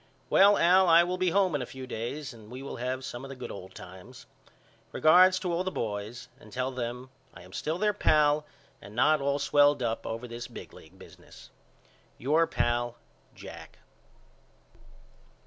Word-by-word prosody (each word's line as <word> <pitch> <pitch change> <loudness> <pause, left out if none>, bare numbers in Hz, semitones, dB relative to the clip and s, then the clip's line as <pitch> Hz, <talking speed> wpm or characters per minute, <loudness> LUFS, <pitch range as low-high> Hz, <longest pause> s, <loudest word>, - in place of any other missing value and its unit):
Well 200 +1 +6
Al 185 +2 +5
I 165 +1 +7
will 180 +1 -3
be 185 -1 +2
home 190 -1 +2
in 145 - -1
a - - -3
few 130 0 -9
days 125 +4 -5
and 110 -2 -15
we 130 +3 -8
will 140 - -7
have 130 +2 -3
some 120 +2 -7
of 135 - -8
the 135 - -7
good 125 - -8
old 95 -1 -10
times. 95 +8 -12 0.7
Regards 185 +4 +5
to 180 -2 -3
all 175 +2 0
the 185 - -2
boys 110 - -5
and 105 - -16
tell 130 +3 -2
them 125 +1 -5 0.2
I - - -12
am 90 +1 -16
still 155 +9 -3
their 210 +2 +1
pal 150 -5 +3 0.4
and 100 +2 -12
not 150 +5 +3
all 140 0 0
swelled 145 -1 +3
up 115 -1 -2
over 115 +2 -5
this 120 +1 -7
big 120 - -11
league 85 +4 -16
business. - - -16 0.7
Your 155 +6 +2
pal, 120 0 -1 0.4
JACK. - - -11
130 Hz, 180 wpm, -28 LUFS, 120-165 Hz, 0.7 s, I